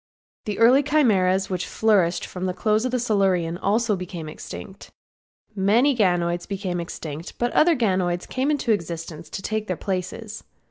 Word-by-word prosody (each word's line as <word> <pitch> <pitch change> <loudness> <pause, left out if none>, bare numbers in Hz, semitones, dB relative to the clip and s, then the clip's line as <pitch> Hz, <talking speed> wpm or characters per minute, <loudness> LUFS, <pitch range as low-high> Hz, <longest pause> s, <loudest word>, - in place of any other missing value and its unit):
The 210 -2 -3
early 245 +5 +6
Chimeras 195 -11 +2
which 185 -1 -2
flourished 195 -6 +2
from 185 0 -3
close 215 +4 +1
of 255 0 0
Silurian 195 -7 +1
also 215 +2 +1
became 180 -3 -6
extinct. 190 +5 -9 0.7
Many 225 +8 +3
ganoids 175 -5 +1
became 190 -3 -3
extinct, 160 -1 -7
but 240 0 -1
other 330 +1 +5
ganoids 185 -7 0
came 260 +3 -1
into 290 -6 +1
existence 165 -4 -3
to 195 - -6
take 215 +1 -2
their 180 - -2
places. 200 +3 -4
195 Hz, 145 wpm, -23 LUFS, 175-225 Hz, 0.7 s, early